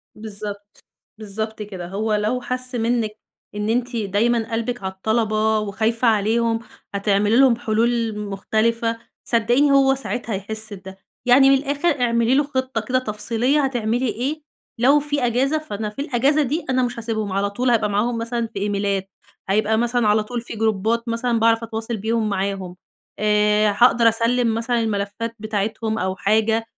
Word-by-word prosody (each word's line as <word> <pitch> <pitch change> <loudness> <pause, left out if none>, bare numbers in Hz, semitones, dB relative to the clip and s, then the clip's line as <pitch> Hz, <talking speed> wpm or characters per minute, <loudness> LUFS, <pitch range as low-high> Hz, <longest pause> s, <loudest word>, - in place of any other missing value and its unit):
بالضبط. 205 -1 -8 0.3
بالضبط 220 +1 -5
كده. 190 -4 -6
هو 210 +4 -2
لو 215 +4 0
حس 255 +1 -4
منِّك 230 -1 0 0.4
إن 210 +1 -2
أنتِ 245 +2 -1
دايمًا 225 +2 0
قلبِك 230 0 -2
على 190 - -2
الطلبة 220 +1 +1
وخايفة 220 +4 0
عليهم، 225 +1 +2 0.4
هتعملي 205 +1 +2
لهم 265 -3 +6
حلول 230 -1 0
مختلفة، 225 +3 -1 0.3
صدقيني 240 +5 +3
هو 270 -1 +5
ساعتها 245 -4 -4
هيحس 215 +2 -5
بده. 190 -1 -10 0.3
يعني 270 +2 +7
من 275 - +6
الآخر 285 +1 -1
اعملي 235 +1 +2
له 290 - +4
خطة 260 -4 -2
كده 255 +4 0
تفصيلية 235 +4 0
هتعملي 245 -1 -1
إيه 270 +7 -2 0.4
لو 275 +5 +5
في 290 -2 -1
أجازة، 260 +6 +1
فأنا 215 -9 -4
في 210 - -13
الأجازة 280 +2 +2
دي 295 +6 -2
أنا 255 -1 +2
مش 245 -1 -3
هاسيبهم. 220 -3 -3
على 200 +1 0
طول 245 +5 -1
هابقى 220 -3 +2
معاهم 220 +4 0
مثلًا 230 0 -2
في - - -4
إيميلات. 200 -1 -1 0.4
هيبقى 215 +2 +2
مثلًا 240 0 +1
على 210 +1 +3
طول 240 +2 -4
في 235 - -9
جروبات 220 +1 0
مثلًا 230 0 0
باعرف 225 0 +3
أتواصل 225 0 -4
بيهم 220 +1 -1
معاهم. 195 -2 -3 0.4
آآ 210 0 +3
هاقدر 235 -1 +5
أسلِّم 230 +1 +1
مثلًا 235 +1 0
الملفات 220 +1 -2
بتاعتهم 215 +1 -2
أو 190 0 -1
حاجة 220 +3 +1
225 Hz, 155 wpm, -21 LUFS, 210-245 Hz, 0.4 s, يعني